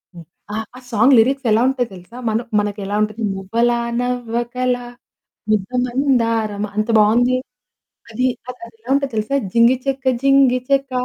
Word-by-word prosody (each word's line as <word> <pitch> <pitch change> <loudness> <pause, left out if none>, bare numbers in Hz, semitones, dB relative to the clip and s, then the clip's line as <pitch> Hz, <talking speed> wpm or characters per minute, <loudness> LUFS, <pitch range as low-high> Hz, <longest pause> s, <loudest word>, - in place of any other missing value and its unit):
హ్మ్. 170 - -11 0.3
ఆహ్, 220 0 -3
ఆ - - -9
సాంగ్ 235 +4 +5
లిరిక్స్ 265 +3 +1
ఎలా 220 +2 +4
ఉంటాయో 250 -3 -1
తెలుసా. 180 +7 -13
మన 220 +1 +1 0.2
మనకు 205 0 -2
ఎలా 200 +1 -3
ఉంటది, 215 +2 -4
మువ్వలా 235 +5 0 0.2
నవ్వకలా 245 0 -2 0.7
ముద్దమందారమా 230 -2 0
అంత 215 +2 0
బావుంది. 245 +4 +3 0.7
అది, 255 +3 0 0.2
అసలా 250 -1 -9
అదేలా 230 +2 -17
ఉంటదో 275 -1 0
తెలుసా? 215 +6 -1 0.2
జింగి 235 +2 +5
చెక 275 0 -2 0.2
జింగి 275 -2 +4
చెక 275 -1 +1
240 Hz, 140 wpm, -19 LUFS, 220-255 Hz, 0.7 s, సాంగ్